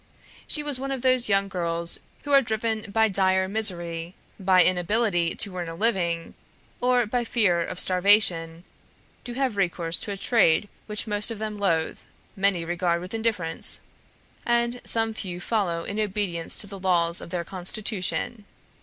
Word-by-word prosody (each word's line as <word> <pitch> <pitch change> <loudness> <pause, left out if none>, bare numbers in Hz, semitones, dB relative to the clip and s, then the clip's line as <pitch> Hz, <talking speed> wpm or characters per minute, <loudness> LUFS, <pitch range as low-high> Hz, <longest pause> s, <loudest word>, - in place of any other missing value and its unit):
She 300 - 0
was 290 -3 0
one 275 +1 -4
of 265 -2 -4
those 255 -3 +2
young 195 0 +2
girls 170 -2 +1 0.2
who 290 - -5
are 275 -1 +7
driven 220 -2 -2
by 220 +1 +3
dire 190 -1 +2
misery, 175 -5 0 0.2
by 185 -1 +5
inability 180 0 +2
to 195 -2 -4
earn 175 -2 -4
a 165 - -7
living, 175 -5 -1 0.5
or 250 -1 +2
by 240 +3 -1
fear 205 -7 +2
of 180 +2 -4
starvation, 180 -3 +3 0.6
to 245 - -5
have 260 -4 -1
recourse 175 -3 -1
to 205 - -5
a 200 - -4
trade 205 -4 +3 0.2
which 210 -1 -2
most 210 0 +3
of 230 - -5
them 215 -1 -5
loathe, 165 -5 0 0.4
many 195 -4 +1
regard 175 0 0
with 180 +3 -8
indifference, 220 -8 +1 0.6
and 240 +1 0
some 225 -1 +1
few 180 -5 -5
follow 180 -5 -1
in 200 +4 -4
obedience 195 -5 -1
to - - +2
the 200 -1 -8
laws 175 -2 +2
of - - -9
their 175 -1 -3
constitution. 200 +4 -3
195 Hz, 165 wpm, -25 LUFS, 175-220 Hz, 0.6 s, are